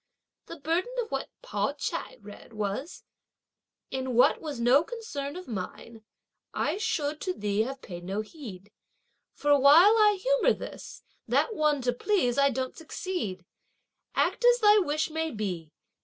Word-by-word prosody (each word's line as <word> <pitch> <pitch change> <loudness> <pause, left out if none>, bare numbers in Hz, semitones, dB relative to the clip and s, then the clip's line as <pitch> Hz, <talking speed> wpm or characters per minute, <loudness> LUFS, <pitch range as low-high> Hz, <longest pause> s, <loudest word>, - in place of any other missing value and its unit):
The - - -7
burden 335 - -1
of 445 - -13
what - - -3
Pao - - -1
ch'ai - - -4
read 205 +3 -13
was: 215 - -4 0.9
In 260 -2 -3
what 255 +5 +4
was 295 -6 -5
no 250 +6 +5
concern 340 - -6
of 365 0 -8
mine, 225 +1 -7 0.5
I - - 0
should 305 -8 -2
to 370 -1 -2
thee 205 0 -2
have 270 +1 -7
paid 175 -2 -8
no 195 +4 -2
heed, 215 - -10 0.6
For 290 0 +3
while 325 +10 +7
I 420 -1 +5
humour - - +3
this, - - -9 0.2
that 455 - +2
one 300 -6 +1
to 245 0 +1
please 250 - +1
I 280 0 +5
don't 260 0 -3
succeed! 320 - -5 0.7
Act - - +1
as 485 0 +6
thy 420 -2 +6
wish 310 -3 -1
may 320 +1 -1
be! 185 - -4
285 Hz, 155 wpm, -28 LUFS, 225-360 Hz, 0.9 s, while